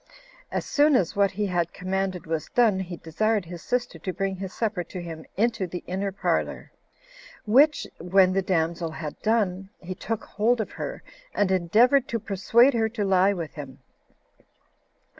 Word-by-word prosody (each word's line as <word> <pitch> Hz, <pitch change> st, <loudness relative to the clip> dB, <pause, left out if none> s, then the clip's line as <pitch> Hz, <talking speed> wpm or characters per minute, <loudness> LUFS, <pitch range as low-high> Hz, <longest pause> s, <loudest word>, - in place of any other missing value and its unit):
As -, -, -2 dB
soon 295 Hz, 0 st, +4 dB
as 185 Hz, -9 st, +1 dB
what 200 Hz, 0 st, +3 dB
he 205 Hz, +2 st, -2 dB
had 175 Hz, -3 st, -1 dB
commanded 185 Hz, -1 st, -2 dB
was 160 Hz, -1 st, -3 dB
done, 225 Hz, -6 st, +4 dB
he 180 Hz, -2 st, -5 dB
desired 205 Hz, +5 st, 0 dB
his 170 Hz, 0 st, -8 dB
sister 245 Hz, 0 st, -2 dB
to 185 Hz, -, -3 dB
bring 190 Hz, +1 st, -2 dB
his 190 Hz, 0 st, -6 dB
supper 210 Hz, -5 st, -2 dB
to 180 Hz, +2 st, -8 dB
him 165 Hz, -2 st, -8 dB
into 225 Hz, -3 st, +1 dB
the 175 Hz, +1 st, -6 dB
inner 195 Hz, +2 st, -2 dB
parlor; 195 Hz, -, -2 dB, 0.7 s
which, 280 Hz, +8 st, +4 dB
when 185 Hz, +2 st, +4 dB
the 195 Hz, -, +2 dB
damsel 170 Hz, -2 st, 0 dB
had 155 Hz, -1 st, -7 dB
done, 195 Hz, -4 st, 0 dB
he 185 Hz, +1 st, -6 dB
took 225 Hz, +3 st, -4 dB
hold 230 Hz, +4 st, +1 dB
of 220 Hz, -, -3 dB
her, -, -, -6 dB, 0.3 s
and 200 Hz, -2 st, +2 dB
endeavored 230 Hz, +9 st, +4 dB
to 230 Hz, -, -2 dB
persuade 225 Hz, +7 st, +3 dB
her 225 Hz, -1 st, +1 dB
to 215 Hz, -3 st, -2 dB
lie 190 Hz, +1 st, +4 dB
with 170 Hz, -5 st, -5 dB
him. 135 Hz, -3 st, -9 dB
195 Hz, 170 wpm, -25 LUFS, 175-220 Hz, 0.7 s, soon